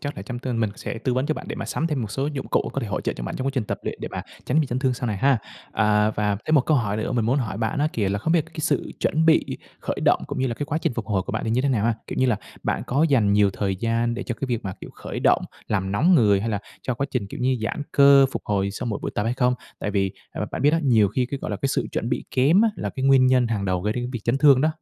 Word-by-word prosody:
chắc 145 0 -5
là 95 - -6
trong 120 +3 -6
tương 120 -2 -2
mình 110 - +1
sẽ 115 - -5
tư 125 +2 -1
vấn 130 +2 0
cho 155 - 0
bạn, - - -8
để - - -3
mà - - -4
sắm 165 - -1
thêm 150 -5 -1
một 105 - -5
số 135 +6 -1
dụng 145 -2 -4
cụ - - 0
có - - -2
thể - - -3
hỗ - - -2
trợ - - -1
cho - - -7
bạn - - -4
trong 130 - -3
quá - - +2
trình 125 -5 0
tập - - -3
luyện, - - -4
để - - -3
mà - - -4 0.2
tránh 150 +5 +2
bị 150 - 0
chấn 125 0 -2
thương 130 -2 +1
sau 125 0 -4
này 105 -3 -1
ha. 135 +4 +3 0.3
À, 105 0 +3
và 105 -1 0
thêm 155 - +2
một 145 - +6
câu 155 - +4
hỏi 105 -5 0
nữa 110 - -2
mình 115 -3 +1
muốn 130 +5 +2
hỏi 105 -6 -3
bạn 115 +7 -1
á 150 - +2
kìa, 100 -4 0
là 100 +1 -1
không 160 - 0
biết 165 -3 +3
là - - -18
cái 155 - -4
sự - - 0
chuẩn 160 +2 +1
bị 160 - +5 0.4
khởi - - -3
động - - +3
cũng - - -5
như 130 - +1
là 120 - -2
cái 145 - -4
quá 155 - -1
trình 125 - -1
phục 115 -4 -4
hồi 95 -3 0
của - - -6
bạn - - -2
thì 110 - -1
như 120 +3 +2
thế 140 - +1
nào 110 -5 +1
ha? 115 - +2
Kiểu - - -6
như 130 - +3
là 120 -5 +2 0.3
bạn - - -1
có 140 +5 +1
dành 115 -8 +3
nhiều 100 -1 +4
thời 95 0 -2
gian 115 +3 0
để - - -4
cho 120 - -4
cái 135 - -1
việc 120 -4 -2
mà, 95 - -3
kiểu, - - -9
khởi - - -6
động - - +3 0.3
làm 95 -2 -1
nóng 175 - +4
người, 105 -7 +4
hay 115 - -2
là 105 -2 -1 0.2
cho 125 - -2
quá 135 +4 -2
trình, 120 -6 -2
kiểu 100 - -8
như, 130 0 +2
giãn 115 - -2
cơ 140 -1 +7
phục - - -4
hồi 100 -1 0
sau 100 - -5
mỗi 105 -3 -2
buổi - - -2
tập 105 - 0
hay 120 +2 0
không? 125 -1 +2 0.2
Tại 105 - -3
vì 95 -2 0 0.2
à, - - -6
mà - - -1
bạn - - -3
biết 145 +2 +4
á, 165 - +2
nhiều 115 -8 +4
khi 125 +5 0
cái, 140 - -3
gọi - - -3
là, 105 - -2
cái 135 - -1
sự - - 0
chuẩn 115 - -2
bị 125 - -2
kém 145 +10 +4
á, 225 - +5
là 105 - -3
cái 130 - -4
nguyên 135 -1 +6
nhân 130 -1 +4
hàng 105 -4 -2
đầu 90 -2 0
gây 105 +2 0
đến 125 +1 -3
việc 120 - -4
chấn 120 +3 +1
thương 140 -2 +6
đó. 155 - +3
120 Hz, 345 wpm, -24 LUFS, 105-135 Hz, 0.4 s, cơ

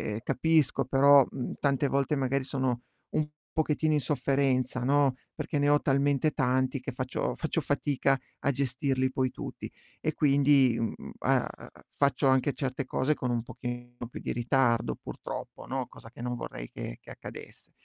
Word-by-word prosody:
e 110 - -5
capisco, 145 -3 +2
però, 140 +1 +6
mhmm, 130 - -4
tante 140 0 +2
volte 140 +2 +1
magari 135 0 0
sono 130 -3 -1 0.3
un 155 -1 0 0.3
pochettino 155 0 +2
in 150 - +3
sofferenza, 130 -1 +1
no, 140 -1 +3 0.2
perché 145 - -3
ne 145 - +2
ho 145 0 +4
talmente 140 +2 +2
tanti 130 0 +1
che 135 - -5
faccio 130 0 -2
faccio 165 +1 -1
fatica 140 -1 +1 0.3
a 140 - +2
gestirli 130 0 0
poi 130 -1 0
tutti. - - -7 0.3
E 155 - -1
quindi, 140 -4 +4
uhm, 115 -1 -1
mhmm, - - -10
a - - +3
a - - -10
a - - -18
faccio 140 0 +2
anche 130 +1 +3
certe 135 -1 -3
cose 135 +3 +1
con 125 - -3
un 120 -1 0
pochino 120 0 -7 0.2
più - - -7
di - - -3
ritardo, 120 - +2
purtroppo, - - -7
no, 130 -1 -3
cosa 115 - -13
che 120 - -11
non 125 0 -2
vorrei - - -6
che - - -6
che - - -15
accadesse. - - -11
135 Hz, 175 wpm, -29 LUFS, 125-140 Hz, 0.3 s, però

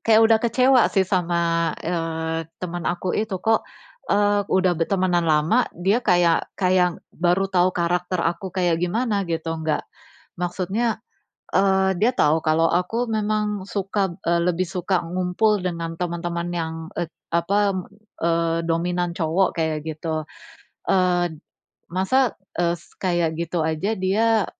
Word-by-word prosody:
kayak 220 -1 +5
udah 225 0 +5
kecewa 250 +2 +4
sih 195 -2 +2
sama, 170 -3 +1
eee, 165 -1 -2
temen 175 -1 -4
aku 175 +1 -2
itu. 215 -3 -1
Kok, 225 +4 +2 0.5
eee, 205 0 +3
udah 185 -1 +3
bertemanan 175 0 +1
lama 160 +11 +3
dia 195 +7 +2
kayak 175 -6 +3
kayak 180 -2 +2 0.2
baru 180 +3 +1
tahu 185 -1 +1
karakter 175 0 0
aku 170 +3 -1
kayak 175 -3 +1
gimana 210 +4 0
gitu. 165 -1 -2
Nggak 160 -1 -2 0.6
maksudnya, 190 +6 -1 0.5
eee, 190 -1 +3
dia 240 +6 +2
tahu 155 -7 +3
kalau 160 +1 +2
aku 225 +7 0
memang 210 -2 -1
suka 195 -2 -1
eee, 170 0 +2
lebih 180 +1 +1
suka 180 +1 -1
ngumpul 180 +5 +1
dengan 165 -2 -4
teman-teman 170 0 -3
yang, 160 -1 -2 0.2
e 170 -1 -2 0.2
apa, 200 +4 +2 0.5
eee, 165 0 +1
dominan 175 +1 0
cowok 170 +2 +1
kayak 160 -2 0
gitu. 155 0 -3 0.7
Eee, 180 -2 +2 0.6
"Masa, 215 +8 +2 0.3
es 170 -1 0 0.2
kayak 175 -3 0
gitu 170 0 -2
aja 160 +7 -1
dia, 215 +3 +2
180 Hz, 130 wpm, -23 LUFS, 170-195 Hz, 0.7 s, kayak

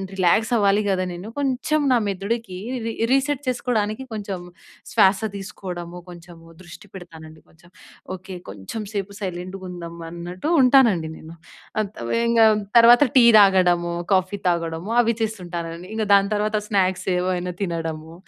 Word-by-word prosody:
Relax 195 +5 +2
అవ్వాలి 205 0 +3
కద 190 -1 +1
నేను 180 +5 -8
కొంచెం 280 +3 0
నా 250 - +5
మెదడుకి 200 0 -3 0.3
రీ 230 - -3 0.2
రీసెట్ 275 +1 +1
చేసుకోవడానికి 240 -2 -1
కొంచెం 200 -3 -5 0.5
శ్వాస 190 0 +4 0.2
తీసుకోవడము, 180 -3 -7
కొంచెం 175 -1 -12 0.2
దృష్టి 175 +3 -13
పెడతానండి. 160 -3 -12
కొంచెం 170 +1 -22 0.5
ఓకె. 185 +1 -10
కొంచెం 100 - -7
సేపు 200 0 -4
సైలెంట్‌గా 185 +1 -6
ఉందాం 170 -2 -8
అన్నట్టు 175 - -6
ఉంటానండి 235 - +4
నేను. 160 +1 -12 0.5
అత 200 - -5 0.2
వేంగా 235 -1 +3 0.3
తర్వాత 235 +1 +8 0.2
టీ 245 - +7
తాగడము, 180 -3 +3 0.2
కాఫీ 185 +2 +1
తాగడము 165 +2 -3
అవి 230 0 +1
చేస్తుంటానండి. 175 -5 -5
ఇంక 220 - -1
దాని 200 0 +4
తర్వాత 210 +1 0
స్నాక్స్ 190 -3 0
ఏవైనా 180 0 -1
తినడము. 165 -3 -4
190 Hz, 130 wpm, -22 LUFS, 175-220 Hz, 0.5 s, తర్వాత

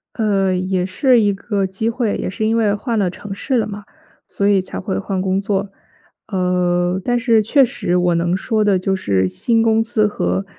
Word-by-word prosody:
呃， 200 -4 +1
也 185 0 -1
是 240 +6 +3
一 205 -1 +2
个 200 0 -2
机 190 +4 -2
会， 230 -2 -1
也 - - -3
是 215 +3 -3
因 225 +1 +1
为 215 -3 +2
换 225 +2 -2
了 190 -3 +1
城 195 +3 -8
市 260 +6 -2
了 225 - +1
嘛， 205 0 -8 0.4
所 200 - -2
以 200 -1 +4
才 185 - -6
会 190 0 -3
换 195 -1 -3
工 190 0 0
作。 200 0 -2 0.6
呃， 180 -2 0
但 245 +3 +1
是 230 -2 +3
确 270 +6 +4
实 245 -8 -1
我 180 -1 +2
能 170 +1 0
说 215 +2 0
的 205 -2 +3
就 190 +1 -1
是 95 - 0
新 225 - +1
公 225 0 +3
司 225 -1 +1
和， 90 - -2
200 Hz, 220 characters per minute, -18 LUFS, 185-220 Hz, 0.6 s, 以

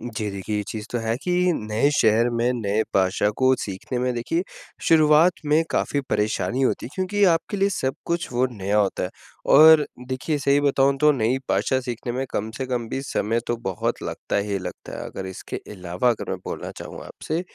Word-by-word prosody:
जी, 110 -3 -4
देखिए 100 +2 -4
ये 105 - 0
चीज़ 110 -1 -5
तो 120 - 0
है 115 0 -1
कि 180 - -1 0.2
नए 110 +1 0
शहर 115 +2 +4
में, 120 +1 +1
नए 110 -3 0
भाषा 95 +2 +2
को 130 0 +4
सीखने 100 +6 -4
में 125 0 0
देखिए 120 +9 -1 0.5
शुरुआत 155 +2 +6
में 150 +2 +4
काफ़ी 145 - 0
परेशानी 110 +5 0
होती 130 - 0
है, - - -10
क्योंकि 200 +2 +1
आपके 165 +5 0
लिए 195 0 +2
सब 135 -9 -1
कुछ 170 0 -1
वो 125 +2 +2
नया 100 -1 0
होता 100 -2 +1
है। 90 - -4 0.4
और 155 +1 +8 0.2
देखिए 130 +4 -1
सही 140 0 +3
बताऊँ 140 -1 +3
तो 150 0 +6
नई 125 -1 +1
भाषा 130 - +2
सीखने 120 -1 -4
में 130 +2 -2
कम 110 +2 -2
से 135 - -2
कम 120 -3 -2
भी 135 - -3
समय 115 -4 -1
तो 120 - 0
बहुत 95 -6 -3
लगता - - -3
ही 100 0 -1
लगता 90 - -8
है, - - -5
अगर 95 - -6
इसके 95 - -6 0.2
अलावा 90 +3 -1
अगर 115 - -3
मैं - - -1
बोलना - - -5
चाहूँगा - - -8
आपसे 160 +2 -4
120 Hz, 200 wpm, -23 LUFS, 105-145 Hz, 0.5 s, और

